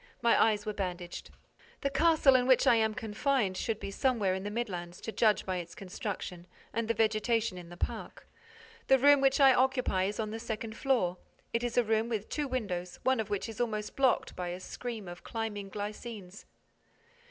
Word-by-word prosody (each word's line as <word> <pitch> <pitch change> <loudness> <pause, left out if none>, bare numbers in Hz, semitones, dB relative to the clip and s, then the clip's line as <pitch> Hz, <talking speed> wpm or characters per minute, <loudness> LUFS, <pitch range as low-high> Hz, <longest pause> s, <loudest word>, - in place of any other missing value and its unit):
My 235 - +5
eyes 210 -2 0
were 215 - -2
bandaged. 180 -3 -5 0.5
The 275 - 0
castle 305 -1 +5
in 250 -1 +3
which 260 -2 +5
I - - +6
am 220 -1 +2
confined 225 -2 0
should 220 +2 -2
be 200 - -5
somewhere 215 -5 +1
in 190 - -3
the 205 - -4
midlands, 180 -6 -4
to 225 - -5
judge 215 -3 +2
by 185 -1 -1
its 170 -1 -7
construction 185 -2 -6 0.3
and 230 0 -1
the 230 - +1
vegetation 220 -1 +1
in 175 -2 -9
the 175 - -11
park. - - -5 0.6
The 265 - +6
room 285 +1 +6
which 270 +1 +3
I 270 -2 +8
occupy 255 -7 +2
is 205 +3 -3
on 215 -1 -2
the 225 - -4
second 225 -1 -5
floor: 225 -11 +1 0.3
it 230 +1 0
is 240 0 -2
a 245 - +6
room 220 +1 +1
with 215 -3 -3
two 295 -2 -2
windows, 190 -9 -3
one 260 -1 +2
of 220 - -2
which 205 +1 -2
is 225 +1 -5
almost 215 -3 -2
blocked 265 -3 +2
by 180 -1 -4
a 175 +1 -4
screen 225 +1 -6
of 175 0 -9
climbing 210 -3 -4
glycines. 205 -1 -7
220 Hz, 200 wpm, -31 LUFS, 195-245 Hz, 0.6 s, I